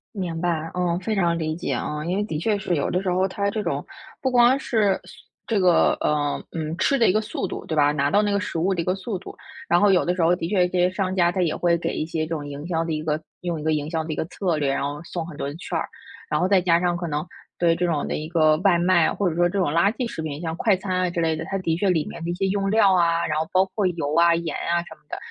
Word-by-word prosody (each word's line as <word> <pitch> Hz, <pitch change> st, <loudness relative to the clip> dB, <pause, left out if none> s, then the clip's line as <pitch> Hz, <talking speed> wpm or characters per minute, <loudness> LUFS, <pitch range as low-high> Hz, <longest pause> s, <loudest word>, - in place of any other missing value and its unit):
明 175 Hz, -4 st, -3 dB
白， 165 Hz, -2 st, -1 dB
嗯， 180 Hz, -1 st, 0 dB
非 215 Hz, +3 st, -2 dB
常 170 Hz, -3 st, +1 dB
理 155 Hz, -1 st, -2 dB
解 175 Hz, -, -3 dB
啊。 150 Hz, +1 st, -3 dB
因 180 Hz, +2 st, -1 dB
为 205 Hz, -, 0 dB
的 160 Hz, -7 st, -4 dB
确 210 Hz, +6 st, 0 dB
是， 180 Hz, -2 st, -1 dB
有 145 Hz, -, -1 dB
的 180 Hz, -, 0 dB
时 190 Hz, -, -2 dB
候 185 Hz, +2 st, +2 dB
它 200 Hz, +1 st, -1 dB
这 215 Hz, +1 st, -3 dB
种 -, -, -2 dB, 0.4 s
不 260 Hz, -, +1 dB
光 245 Hz, +1 st, +5 dB
是 210 Hz, -7 st, +2 dB
速 -, -, -14 dB, 0.4 s
这 220 Hz, -4 st, +1 dB
个， 180 Hz, -2 st, +4 dB
呃， 145 Hz, -1 st, 0 dB
嗯， 160 Hz, 0 st, -4 dB
吃 275 Hz, +7 st, +2 dB
的 230 Hz, -, +5 dB
一 -, -, +5 dB
个 215 Hz, -, +2 dB
速 215 Hz, -1 st, -4 dB
度， -, -, -6 dB
对 160 Hz, -, -3 dB
吧 145 Hz, -1 st, +4 dB
拿 140 Hz, -1 st, 0 dB
到 205 Hz, -, +4 dB
那 205 Hz, -1 st, 0 dB
个 200 Hz, -, +1 dB
食 200 Hz, -5 st, -3 dB
物 190 Hz, +3 st, +1 dB
的 170 Hz, -, -1 dB
一 -, -, -3 dB
个 185 Hz, -, +1 dB
速 195 Hz, +2 st, -4 dB
度。 190 Hz, -, -10 dB, 0.3 s
然 175 Hz, -, +3 dB
后 205 Hz, -, +5 dB
有 180 Hz, -, +3 dB
的 180 Hz, +1 st, 0 dB
时 180 Hz, -, -1 dB
候 170 Hz, +2 st, +4 dB
的 165 Hz, -, -4 dB
确 180 Hz, -1 st, +2 dB
这 180 Hz, 0 st, -3 dB
些 180 Hz, 0 st, +4 dB
商 190 Hz, 0 st, -2 dB
家 175 Hz, -1 st, +3 dB
它 185 Hz, -, -1 dB
也 165 Hz, -3 st, +1 dB
会 175 Hz, -1 st, +2 dB
给 -, -, -2 dB
一 155 Hz, -, -2 dB
些 160 Hz, -1 st, -2 dB
这 165 Hz, -, -2 dB
种 145 Hz, -2 st, -5 dB
营 145 Hz, +2 st, -7 dB
销 165 Hz, -2 st, 0 dB
的 165 Hz, -, -3 dB
一 155 Hz, -, -2 dB
个 155 Hz, -1 st, -1 dB, 0.2 s
用 170 Hz, -3 st, -3 dB
一 -, -, -7 dB
个 160 Hz, 0 st, +1 dB
营 150 Hz, 0 st, -2 dB
销 160 Hz, -1 st, -1 dB
的 155 Hz, 0 st, -4 dB
一 -, -, -5 dB
个 -, -, -1 dB
策 175 Hz, 0 st, -2 dB
略， 145 Hz, -2 st, 0 dB
然 140 Hz, -, -1 dB
后 145 Hz, +1 st, -4 dB
送 170 Hz, -1 st, -5 dB
很 165 Hz, -, -9 dB
多 140 Hz, -, -4 dB
的 145 Hz, -, -6 dB
券 175 Hz, 0 st, -6 dB
儿。 -, -, -3 dB, 0.4 s
然 150 Hz, -, +1 dB
后 180 Hz, -, +2 dB
再 190 Hz, -1 st, +4 dB
加 170 Hz, -1 st, +3 dB
上 175 Hz, -1 st, 0 dB
可 175 Hz, 0 st, -4 dB
能， 150 Hz, 0 st, -2 dB, 0.3 s
对 170 Hz, -1 st, +3 dB
这 175 Hz, +1 st, 0 dB
种 160 Hz, -4 st, -1 dB
的 -, -, -2 dB
一 155 Hz, +1 st, -4 dB
个 155 Hz, -2 st, +3 dB
外 185 Hz, -4 st, +4 dB
卖， 175 Hz, -1 st, +3 dB
或 200 Hz, -3 st, 0 dB
者 160 Hz, -, -4 dB
说 175 Hz, +1 st, +3 dB
这 195 Hz, +3 st, -2 dB
种 180 Hz, -, +2 dB
垃 170 Hz, +6 st, +3 dB
圾 250 Hz, -1 st, -3 dB
食 165 Hz, -, -6 dB
品， 150 Hz, -1 st, -5 dB
像 165 Hz, -1 st, -3 dB
快 210 Hz, -1 st, +3 dB
餐 185 Hz, 0 st, -3 dB
啊， 185 Hz, -1 st, +1 dB
之 170 Hz, -1 st, -2 dB
类 160 Hz, -1 st, +1 dB
的， 160 Hz, +1 st, -5 dB
它 195 Hz, -, -2 dB
的 165 Hz, -3 st, 0 dB
确 190 Hz, +3 st, +1 dB
里 160 Hz, -4 st, 0 dB
面 -, -, -8 dB
的 170 Hz, -, -2 dB
一 -, -, -1 dB
些 195 Hz, +2 st, -1 dB
用 195 Hz, 0 st, 0 dB
料 215 Hz, -3 st, +5 dB
啊， 170 Hz, -1 st, +2 dB
然 150 Hz, 0 st, -1 dB
后 160 Hz, -, -1 dB
包 185 Hz, 0 st, +4 dB
括 210 Hz, -, +1 dB
油 165 Hz, -4 st, -1 dB
啊、 170 Hz, 0 st, +5 dB
盐 165 Hz, -2 st, -2 dB
啊 170 Hz, 0 st, 0 dB
什 -, -, -11 dB
么 -, -, -30 dB
的， -, -, -4 dB
175 Hz, 340 characters per minute, -23 LUFS, 160-190 Hz, 0.4 s, 光